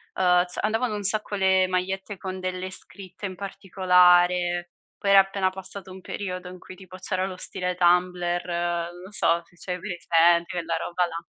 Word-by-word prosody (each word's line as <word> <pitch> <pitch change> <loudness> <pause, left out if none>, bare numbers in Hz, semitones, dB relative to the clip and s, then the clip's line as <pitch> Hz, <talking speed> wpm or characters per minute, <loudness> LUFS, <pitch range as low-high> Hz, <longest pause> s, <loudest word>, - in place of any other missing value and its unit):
uhm, 180 -1 +4
s 180 - -9
andavano 225 +1 0
un 205 - -5
sacco 210 +1 +1
le 190 -1 +3
magliette 190 +2 -3
con 185 0 -6
delle 185 0 -4
scritte 190 +1 -6
in 185 - -8
particolare. 180 -2 +3 0.3
Poi 200 - 0
era 195 - +9
appena 195 -1 +2
passato 190 0 -8
un 185 0 -10
periodo 185 -1 -5
in 185 - -10
cui 185 - -12
tipo 185 0 -12
c'era 185 0 -2
lo 185 - -6
stile 180 -1 -3
Tumblr, 175 0 +2
non 175 0 -2
lo 190 - -11
so, 170 -4 +2
se - - -26
c'hai 180 -1 -4
presente 170 -2 +3
quella 170 -2 -1
roba 180 +1 -1
là. 170 -1 -6
185 Hz, 180 wpm, -25 LUFS, 175-190 Hz, 0.3 s, era